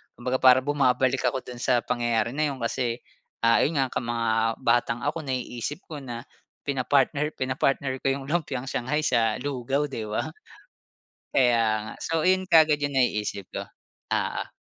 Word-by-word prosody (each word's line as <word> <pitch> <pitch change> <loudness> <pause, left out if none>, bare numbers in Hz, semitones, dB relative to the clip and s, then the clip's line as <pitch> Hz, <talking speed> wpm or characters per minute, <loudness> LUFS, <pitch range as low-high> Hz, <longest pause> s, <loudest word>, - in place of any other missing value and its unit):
Kumbaga 125 +2 -2
parang 130 0 +6
bumabalik 130 -2 +2
ako 130 +1 -1
dun 125 -1 -9
sa 120 -1 +2
pangyayari 120 -2 0
na 150 +2 0
'yun 135 -4 -5
kasi, 120 0 -2 0.4
ah, 115 0 +5
ayun 160 - +1
nga, 135 -2 +1
ka 125 - -1
mga 115 -1 -1 0.3
batang 120 -1 +2
ako, - - -1
naiisip 130 +4 -4
ko 155 -4 -8
na 120 -3 -7 0.4
pinapartner 140 +2 +1
pinapartner 130 0 0
ko - - -2
'yung 135 0 0
lumpiang 145 -4 -2
shanghai 150 +6 -1
sa 115 -6 +2
lugaw, 135 0 -1
'di 110 -5 -5
ba. 105 - -2 1.0
Kaya 115 -4 +2
nga. - - -10
So 165 0 -1
ayun 185 0 +2
kaagad 155 -3 +5
'yung 145 -1 -2
naiisip 105 -6 0
ko, - - -5 0.5
oo. - - -2
130 Hz, 160 wpm, -26 LUFS, 120-145 Hz, 1.0 s, parang